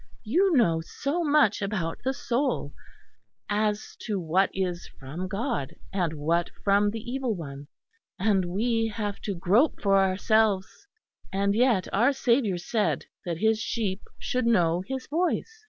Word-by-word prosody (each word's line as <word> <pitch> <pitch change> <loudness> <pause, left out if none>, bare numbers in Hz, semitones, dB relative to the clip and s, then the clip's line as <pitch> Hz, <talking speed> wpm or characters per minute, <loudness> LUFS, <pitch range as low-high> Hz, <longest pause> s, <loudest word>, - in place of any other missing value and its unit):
You 335 - +3
know 165 -9 +3
so 290 - -2
much 290 -10 +3
about 190 -5 -2
the 260 - +1
soul, 270 0 -1 0.8
as 210 0 -1
to 210 -4 -2
what 180 +3 +2
is 180 -2 -3
from 155 +8 -5
God 195 - -3 0.2
and 175 -5 0
what 165 +3 0
from 205 +1 +3
the 225 +1 -5
Evil 245 -1 -2
One; 140 -4 -8 0.5
and 195 -1 +2
we 225 +5 0
have 210 -2 -4
to 200 - -3
grope 200 - +2
for 195 -1 +3
ourselves. 195 - +1 0.4
And 200 +1 +1
yet 230 -4 +3
our 240 +8 +4
Saviour 235 -7 +2
said 210 +5 -1 0.2
that 170 -2 -2
His 220 +3 +2
sheep 210 -4 -2 0.2
should 250 -2 -1
know 175 -6 +3
His 265 0 -4
voice. 360 +7 -1
205 Hz, 145 wpm, -27 LUFS, 185-240 Hz, 0.8 s, our